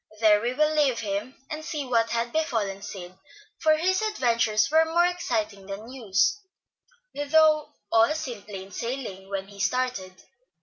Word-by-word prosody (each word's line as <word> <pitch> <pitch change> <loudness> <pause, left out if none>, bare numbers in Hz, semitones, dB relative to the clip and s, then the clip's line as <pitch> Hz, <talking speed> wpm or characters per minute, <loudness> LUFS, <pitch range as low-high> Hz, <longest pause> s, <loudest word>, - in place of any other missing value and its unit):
There 210 -2 +5
we 240 +2 -1
will 305 +2 +2
leave 285 -6 +2
him, 210 +4 -3 0.2
and 305 0 -4
see 300 -2 -4
what 230 -3 +2
had 235 0 -1
befallen 220 -11 -1
Sid; 185 -3 -8 0.5
for 310 -1 +4
his 370 +4 +1
adventures 235 - +1
were 320 +1 +6
more 335 +2 +2
exciting 215 - -2
than 205 +4 -7
Hugh's, 220 - +1 0.7
though 305 +1 +3 0.2
all 225 +7 +4
seemed 245 -11 -6
plain 195 -1 -8
sailing 230 -5 -5
when 195 0 -4
he 200 -1 -14
started. 200 -3 -1
235 Hz, 155 wpm, -26 LUFS, 200-305 Hz, 0.7 s, were